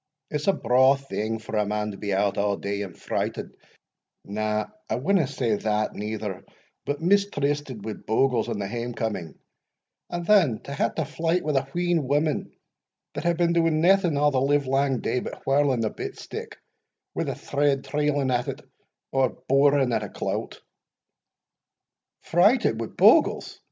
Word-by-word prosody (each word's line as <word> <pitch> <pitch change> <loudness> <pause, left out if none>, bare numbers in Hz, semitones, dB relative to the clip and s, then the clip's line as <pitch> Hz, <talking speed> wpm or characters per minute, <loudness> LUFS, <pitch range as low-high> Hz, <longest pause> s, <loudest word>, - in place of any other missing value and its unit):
It's 150 +2 -3
a 195 - +5
braw 130 +1 +4
thing 115 -5 -3
for 110 0 -7
a 105 - +2
man 105 0 -2
to 100 - -9
be 100 0 -4
out 100 +1 +1
a' 100 -1 0
day, 100 0 -3
and 95 -4 -7
frighted - - -3 0.7
na, 105 +1 -1 0.2
I - - 0
winna 160 +3 +2
say 120 -6 -1
that 105 0 -1
neither 105 -2 -5 0.4
but 145 +2 -2
mistrysted 145 - +1
wi' 110 - -3
bogles 115 +1 0
in - - -2
the 100 -1 -3
hame 120 +2 -4
coming, 105 -8 -3 0.7
an' 175 0 -3
then 170 - +4
to 140 - -7
hae 140 - +1
to 160 - -1
flyte 165 +4 -1
wi' 150 - -1
a 135 0 +1
wheen 170 0 0
women 145 +2 0 0.6
that - - -5
hae 170 - +3
been 170 0 +1
doing 165 -2 +2
naething 175 -2 +3
a' 145 +1 +3
the 130 -2 +1
live 140 +1 +2
lang 135 -1 +1
day, 125 - 0
but - - -8
whirling 135 -4 +2
a 110 - -1
bit - - -6
stick, - - -8 0.6
wi' - - -2
a - - -5
thread 140 -1 0
trailing 145 -3 0
at 125 +2 0
it, 135 -1 -4 0.5
or 135 -1 +2 0.2
boring 140 -2 +4
at 110 - +1
a 105 - -5
clout." - - -4 1.6
"Frighted 185 - +3
wi' 115 - -3
bogles!" - - +3
135 Hz, 170 wpm, -25 LUFS, 110-150 Hz, 1.6 s, a